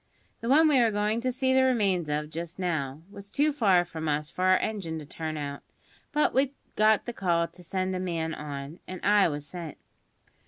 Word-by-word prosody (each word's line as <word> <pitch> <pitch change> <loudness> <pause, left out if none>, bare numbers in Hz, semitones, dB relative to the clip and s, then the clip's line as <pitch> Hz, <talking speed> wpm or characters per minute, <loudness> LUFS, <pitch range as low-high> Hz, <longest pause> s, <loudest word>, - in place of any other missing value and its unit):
The 230 - -4
one 310 +4 +6
we 285 -4 +5
are 235 -2 +4
going 210 +2 0
to 255 +1 0
see 260 +1 +1
the 265 - +5
remains 200 -11 +2
of 150 +1 -2
just 170 +1 -6
now 160 -5 -2
was 200 -1 -11
too 295 +7 +2
far 195 -10 +3
from 160 -2 -5
us 150 0 -1
for 185 - -1
our 185 0 +6
engine 190 -8 -3
to 155 - -7
turn 155 +1 -5
out; 140 -1 -5 0.5
but 300 0 +2
we 270 +1 +1 0.2
got 215 0 +4
the 240 - -4
call 170 -5 +1
to 180 +1 -16
send 185 +2 -2
a - - -2
man 165 -3 -2
on, 145 +1 -6
and 185 -1 -6
I 205 -1 +5
was 145 -2 -4
sent. 165 0 -7
185 Hz, 210 wpm, -28 LUFS, 160-220 Hz, 0.5 s, one